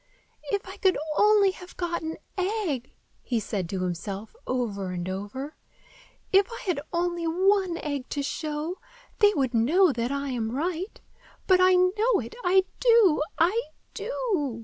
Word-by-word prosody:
"If 405 -2 -1
I 380 +2 -8
could 380 -2 +3 0.2
only 415 0 +5
have 365 -1 -13
got 345 -1 -2
an 320 0 -4 0.2
egg!" 370 - -2 0.3
he 240 -3 -1
said 195 -4 -3
to 185 -1 -2
himself, 190 - -4
over 210 -7 -2
and 180 -1 -4
over. 205 +10 -5 0.8
"If 395 +4 +5
I 465 - -6
had 355 -7 0
only 345 0 -1
one 375 +1 +2
egg 285 -5 -4
to 285 - -2
show, 305 +4 -3 0.4
they 415 -2 +6
would 265 -4 0
know 310 +11 +4
that 235 +1 -2
I 280 0 -2
am 230 -3 -2
right. 355 +5 -3 0.5
But 370 -1 +5
I 370 0 +6
know 405 +6 +3
it! 230 -1 -7
I 375 +1 +4 0.2
do! 455 -11 +5 0.2
I 365 +8 +3 0.3
do!" 405 - -2
335 Hz, 155 wpm, -26 LUFS, 250-385 Hz, 0.8 s, they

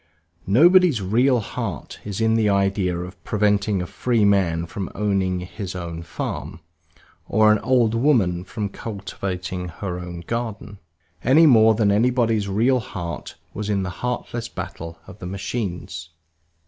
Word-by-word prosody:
Nobody's 170 - +5
real 120 +7 +3
heart 105 - -5
is 100 0 -5
in 110 0 +3
the 110 -2 +3
idea 100 -2 +1
of 90 +3 -8
preventing 105 -2 +1
a - - -4
free 115 +3 +1
man 90 -5 +2
from 95 +2 -5
owning 95 -3 0
his 95 +1 -6
own 85 -2 -5
farm, 85 0 -5 0.7
or 110 0 +5
an 105 - +3
old 120 -4 +2
woman 115 -9 +2
from 105 +2 -4
cultivating 95 -3 -5
her 90 +1 -5
own 90 -1 -7
garden, 110 0 -5 0.4
any 155 +6 +6
more 110 -6 +6
than 105 -2 +3
anybody's 115 -1 +2
real 115 +6 +2
heart 85 - -6 0.2
was 105 0 -4
in 100 -2 +1
the 90 - -3
heartless 120 -1 -3
battle 85 -6 -7
of 100 +1 -13
the 90 - -6
machines. 95 -4 -4
100 Hz, 145 wpm, -23 LUFS, 90-115 Hz, 0.7 s, any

